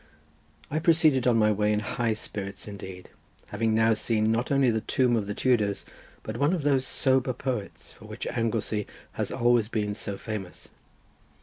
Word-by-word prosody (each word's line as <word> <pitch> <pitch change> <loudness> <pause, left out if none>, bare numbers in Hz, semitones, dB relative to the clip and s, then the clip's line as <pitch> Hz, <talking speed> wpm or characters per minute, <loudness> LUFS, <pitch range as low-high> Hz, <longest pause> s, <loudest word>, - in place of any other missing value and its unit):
I 155 - 0
proceeded 155 -6 +3
on 120 -2 +4
my 110 -1 +4
way 105 0 +1
in 105 - +2
high 115 +2 -1
spirits 100 -2 -5
indeed, 95 -3 -9 0.4
having 110 -1 0
now 110 0 +4
seen 110 0 +1
not 115 +4 -1
only 135 -3 +4
the 110 -1 -1
tomb 125 0 +2
of 105 -3 -1
the 105 - -3
Tudors, 105 -6 +1 0.4
but 110 +1 -5
one 145 +6 +2
of 170 -5 -1
those 135 -2 +2
sober 130 -1 +2
poets 120 -6 -5
for - - -15
which - - -7
Anglesey 115 -3 -1 0.2
has - - -3
always 120 -2 +3
been 105 -3 -2
so 100 -1 -4
famous. 100 -5 -7
115 Hz, 175 wpm, -27 LUFS, 105-130 Hz, 0.4 s, on